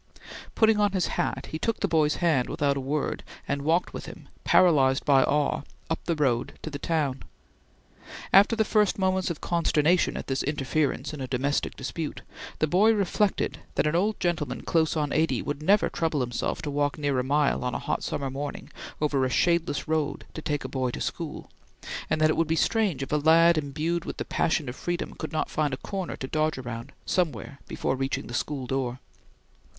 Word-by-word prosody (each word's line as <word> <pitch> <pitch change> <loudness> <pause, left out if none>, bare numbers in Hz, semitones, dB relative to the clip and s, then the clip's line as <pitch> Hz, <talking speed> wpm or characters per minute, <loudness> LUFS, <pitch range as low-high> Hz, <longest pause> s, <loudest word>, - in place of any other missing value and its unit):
Putting 220 -1 +4
on 205 -1 +2
his 185 -3 +1 0.2
hat, - - -3
he 155 - -3
took 230 +5 -1
the - - +1
boy's 155 -2 +2
hand 155 -8 +1
without 140 -1 +1
a - - -2
word, 140 +2 -2 0.2
and 140 0 -1
walked 165 +5 +1
with - - -6
him, - - -11
paralyzed 140 -7 +4
by 135 -2 +5
awe, 145 0 +1 0.3
up 160 - 0
the 170 - 0
road 130 -5 0
to 155 - -5
the 140 - -5
town. 145 -4 -1 1.1
After 200 +4 +7
the 220 -1 +2
first 210 -2 +2
moments 190 -1 +1
of 170 - -5
consternation 170 0 +2
at - - -5
this 135 0 -1
interference 145 0 -1
in 150 - -6
a 130 - -3
domestic 135 +3 -1
dispute, 150 +3 -4 0.4
the - - +2
boy 195 +8 +4
reflected 205 0 0 0.2
that - - +2
an 150 +2 +1
old 205 +5 +1
gentleman 150 -8 -1
close 160 -1 +1
on 150 -2 0
eighty 160 +1 +2
would 145 0 -4
never 200 +6 +4
trouble 160 -4 -1
himself 120 +4 -2
to 150 - -3
walk 145 0 0
near 145 -3 0
a - - 0
mile 145 +1 +1
on 125 - -2
a - - +1
hot - - -2
summer 135 -2 -3
morning 140 +2 -5 0.3
over 145 -3 +1
a 130 - +1
shadeless 170 +1 +1
road 155 -2 -1
to 160 - -6
take 145 -2 -2
a - - -3
boy 130 -2 -1
to - - -5
school, - - -4 0.6
and - - +1
that 155 0 +4
it - - -1
would 165 - +2
be 160 - +1
strange 195 - +1
if - - -7
a 150 - +3
lad 165 +3 +6
imbued 155 +3 -1
with - - -5
the - - -3
passion 160 -3 0
of 125 - -5
freedom 175 +4 -3
could 155 - -6
not 155 - -1
find 150 -3 0
a - - -13
corner 190 +4 -4
to - - -5
dodge 155 +2 0
around, 120 -2 -6
somewhere 155 -5 -1
before - - -1
reaching 135 +1 -2
the 120 - -8
school 135 +1 -2
door. 125 -1 -2
150 Hz, 205 wpm, -27 LUFS, 140-170 Hz, 1.1 s, After